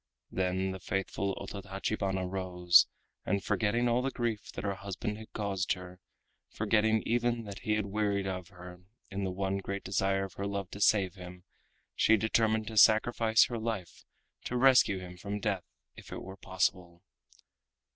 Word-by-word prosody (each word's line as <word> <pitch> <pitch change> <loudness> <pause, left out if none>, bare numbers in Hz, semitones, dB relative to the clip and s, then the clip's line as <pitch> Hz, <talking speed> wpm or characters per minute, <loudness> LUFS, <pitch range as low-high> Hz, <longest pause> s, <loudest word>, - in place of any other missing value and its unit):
Then 95 0 0
the 95 - -6
faithful 95 +1 -2
Ototachibana 95 -1 -3
rose, 90 -2 +4 0.4
and 100 0 -1
forgetting 110 +4 +1
all 120 +1 +2
the 135 - 0
grief 120 -5 -3
that - - -6
her 100 -1 0
husband 100 +2 -5
had 110 - -11
caused 100 -3 -1
her, 90 0 -10 0.5
forgetting 110 0 +2
even 120 0 +1
that 100 -2 -8
he 105 - -1
had 105 -1 0
wearied 100 -1 0
of 90 -2 -4
her, 90 -1 -12 0.3
in 100 0 -3
the 95 - -2
one 95 +1 -1
great 100 +1 -4
desire 95 0 +1
of 95 - -6
her 100 - -4
love 100 -2 -4
to 100 - -7
save 100 -3 +3
him, 90 -1 -11 0.5
she 110 - +4
determined 110 +1 +1
to 110 - -6
sacrifice 110 +1 +5
her 120 -2 -4
life 110 -6 -4 0.4
to 125 - -2
rescue 125 -6 +5
him 90 -1 -9
from 100 +3 -4
death 100 -4 -1 0.3
if - - -13
it - - -6
were 95 +1 -8
possible. 90 -2 -2
100 Hz, 165 wpm, -31 LUFS, 95-110 Hz, 0.5 s, sacrifice